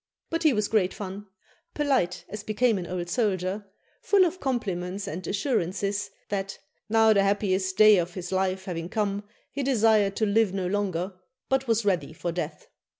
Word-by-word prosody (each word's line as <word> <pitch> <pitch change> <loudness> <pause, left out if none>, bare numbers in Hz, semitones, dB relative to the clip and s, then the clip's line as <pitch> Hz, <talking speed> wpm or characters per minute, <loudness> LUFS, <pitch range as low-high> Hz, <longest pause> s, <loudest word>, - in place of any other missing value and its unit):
But 330 0 -1
he 315 -3 +5
was 210 -4 +1
great 195 -4 +1
fun; 200 +1 -7 0.5
polite 180 - 0
as 210 0 -6
became 215 +1 +1
an 175 - -6
old 175 -1 -3
soldier, 200 -1 -1 0.3
full 395 -2 +4
of 360 +2 -2
compliments 200 - -2
and 175 +3 -5
assurances 200 - -1 0.2
that 195 -1 -3 0.3
'now 220 0 +5
the 200 - +4
happiest 195 -2 +1
day 215 -2 +8
of 175 +1 -3
his 180 -1 -5
life 190 0 0
having 170 -2 -4
come, 205 -1 -1 0.3
he 280 - -3
desired 220 -6 +3
to 220 - +1
live 205 -2 +2
no 190 -2 -1
longer, 190 -1 -1 0.4
but 265 0 +1
was 225 -1 +1
ready 185 -5 0
for 170 +2 -3
death.' 180 - -5
200 Hz, 170 wpm, -26 LUFS, 185-220 Hz, 0.5 s, day